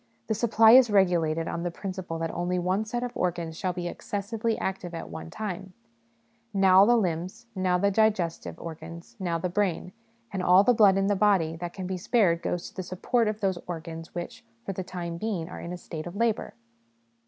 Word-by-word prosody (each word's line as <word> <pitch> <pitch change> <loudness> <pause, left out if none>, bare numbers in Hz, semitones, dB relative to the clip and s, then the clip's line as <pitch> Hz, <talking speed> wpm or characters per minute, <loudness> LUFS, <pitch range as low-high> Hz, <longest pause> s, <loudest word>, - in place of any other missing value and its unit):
The 220 - 0
supply 225 0 +5
is 250 -1 +8
regulated 170 -5 +2
on 170 - -3
the 175 - -1
principle 185 -2 -5
that 165 0 -2
only 180 +1 -1
one 185 +4 0
set 240 +3 -3
of 245 - -3
organs 170 -2 -2
shall 185 +2 -1
be 175 -1 -4
excessively 215 +5 -3
active 185 -2 -4
at 165 - -7
one 160 0 -7
time 190 -1 -5 0.8
now 190 0 +7
the 240 +2 +5
limbs, 185 +2 -2
now 185 -2 +1
the 200 +2 +2
digestive 200 -5 0
organs, 170 +5 -9
now 175 -3 -1
the 165 - -2
brain; 180 -1 -1 0.4
and 190 - -1
all 180 +2 +6
the 245 - +4
blood 205 -4 +5
in 195 - +2
the 205 0 +2
body 190 -5 +3
that 175 +1 -5
can 190 - -6
be 185 0 -3
spared 185 -4 +2
goes 175 - -3
to - - -24
the 190 - -3
support 200 +6 0
of 215 0 -2
those 190 -3 0
organs 165 -1 -7
which, 175 0 -6 0.2
for 195 - -3
the 185 - -4
time 170 -2 -5
being, 190 -4 -3
are - - -8
in 170 - -6
a 180 - -4
state 165 -2 -7
of 175 - -8
labour. 230 0 0
185 Hz, 205 wpm, -27 LUFS, 170-205 Hz, 0.8 s, is